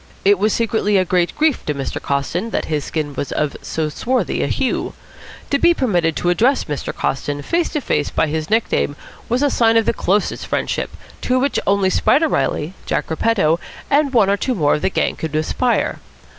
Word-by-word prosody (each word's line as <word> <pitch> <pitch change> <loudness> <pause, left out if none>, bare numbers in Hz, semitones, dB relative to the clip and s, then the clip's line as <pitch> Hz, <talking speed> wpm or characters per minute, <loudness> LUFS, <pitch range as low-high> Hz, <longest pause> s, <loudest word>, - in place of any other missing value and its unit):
It 200 -1 +5
was 215 +2 +2
secretly 220 -3 +1
a 185 - +2
great 175 -1 +1
grief 310 -3 +2
to 150 - 0
Mr. 135 -1 -4
Coston 155 +9 -2
that - - -2
his 150 -2 -2
skin 150 -3 -3
was 140 - -4
of 150 -1 -1
so 160 -1 -2
swarthy 250 - -1
a - - 0
hue. - - -1 0.6
To 280 - +2
be 345 +2 +4
permitted 175 - +1
to 175 - +1
address 245 +9 +2
Mr. 150 -3 -4
Coston 145 +1 -2
face 340 - 0
to 300 - -2
face 150 - 0
by - - +1
his 155 +1 -3
nickname 215 -9 +1 0.3
was 245 +4 +1
a 285 - +3
sign 230 -1 +3
of 225 - +3
the - - +2
closest 205 -1 0
friendship, - - -1 0.3
to 255 - +1
which 275 +2 +1
only 200 -1 +3
Spider 320 +10 +3
Reilly, 165 - -1
Jack - - -1
Repetto, 170 -3 +2 0.3
and 285 -1 +3
one 215 -6 +4
or 200 - +2
two 255 +4 -1
more 150 -7 +2
of 150 - -1
the - - +1
gang - - 0
could 160 -2 -5
aspire. 235 +10 0
195 Hz, 200 wpm, -19 LUFS, 155-245 Hz, 0.6 s, It